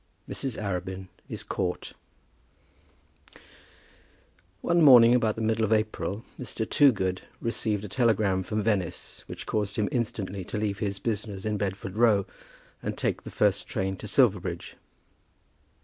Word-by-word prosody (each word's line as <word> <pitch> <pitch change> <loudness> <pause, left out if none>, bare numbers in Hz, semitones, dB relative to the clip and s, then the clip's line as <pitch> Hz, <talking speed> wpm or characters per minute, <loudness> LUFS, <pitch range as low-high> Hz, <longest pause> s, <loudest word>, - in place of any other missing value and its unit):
MRS. 130 -4 -2
ARABIN 95 -2 -4 0.2
IS - - -5
CAUGHT. 90 -2 -3 2.7
One 170 0 +2
morning 120 -5 +9
about 115 -4 +2
the 110 - -3
middle 110 0 +1
of 110 - 0
April 110 -2 0
Mr. 115 -3 -3
Toogood 95 -10 +3 0.2
received 110 -3 -1
a - - -4
telegram 105 -4 +2
from 105 +3 -2
Venice 100 -6 -2
which - - -7
caused 105 -1 -1
him 105 -2 +1
instantly 100 -6 -2
to - - -4
leave 105 -1 -1
his 100 -3 -2
business 105 -1 -3
in 105 -1 0
Bedford 95 0 -3
Row 110 -4 +4 0.6
and - - -4
take - - -1
the - - -9
first 100 -1 +1
train 95 0 -1
for - - -8
Silverbridge. - - +1
105 Hz, 135 wpm, -27 LUFS, 95-110 Hz, 2.7 s, morning